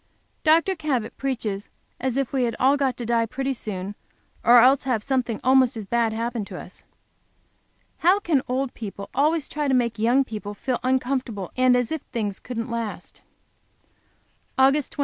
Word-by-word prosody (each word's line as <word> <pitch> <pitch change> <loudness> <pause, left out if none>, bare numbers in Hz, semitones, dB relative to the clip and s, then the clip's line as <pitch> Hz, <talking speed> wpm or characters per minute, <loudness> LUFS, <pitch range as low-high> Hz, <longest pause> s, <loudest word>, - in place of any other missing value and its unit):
Dr. 330 +4 +4
Cabot 265 -9 -2
preaches 225 -7 -3 0.3
as 260 0 -1
if 275 -1 -1
we 260 -2 +2
had 230 - -2
all 270 +2 +4
got 270 -4 0
to 240 - -5
die 230 0 +1
pretty 270 +3 -2
soon, 200 -5 -5 0.5
or 240 +1 +8
else 260 +3 +5
have 240 -5 0
something 255 -5 -1
almost 260 -2 +4
as 215 - -5
bad 230 +2 +1
happen 230 0 -2
to - - -8
us. - - -11 1.2
How 365 +4 +4
can 320 -9 +1
old 260 +1 -1
people 200 -2 -7
always 300 +3 +2
try 295 -1 -2
to 265 - +3
make 235 -3 0
young 240 +5 +4
people 210 -4 -7
feel 255 +3 -2
uncomfortable, 255 -6 -1
and 255 -1 +4
as 245 -2 -1
if 320 -3 -2
things 205 -4 -2
couldn't 230 -1 -5
last? 230 -2 -5 1.4
Aug. 265 +1 +6
25. 290 -1 -2
250 Hz, 170 wpm, -24 LUFS, 230-270 Hz, 1.4 s, or